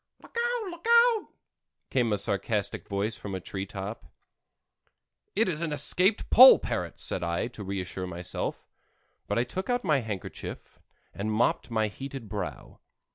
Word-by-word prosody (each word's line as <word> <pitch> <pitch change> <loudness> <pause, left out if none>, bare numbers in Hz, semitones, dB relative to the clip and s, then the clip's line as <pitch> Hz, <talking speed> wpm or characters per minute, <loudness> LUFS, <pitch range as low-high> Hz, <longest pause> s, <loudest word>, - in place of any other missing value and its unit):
"Look - - -18
out, 475 -3 -1
look 345 +5 -9
out!" 470 -2 +5 0.6
came 120 -4 +2
a 105 - +2
sarcastic 100 +1 -2
voice 100 +3 -1
from 100 - -7
the 95 - -2
tree 95 +2 -5
top. 95 -3 -7 1.3
"It 220 +1 +3
is 165 -3 -1
an 165 -2 -2
escaped 180 +8 +3
Poll 260 +2 +10
parrot," - - -4
said - - -2
I, 85 0 -1
to 110 -4 -9
reassure 95 -1 -4
myself, 85 0 -4 0.6
but 105 - -1
I 120 - +3
took 185 - -5
out 245 0 +1
my 155 -7 +3
handkerchief 110 -6 -7 0.3
and 105 +2 -3
mopped 115 +2 +1
my 110 -2 +1
heated 135 +2 -7
brow. 100 -3 -6
110 Hz, 155 wpm, -28 LUFS, -, 1.3 s, Poll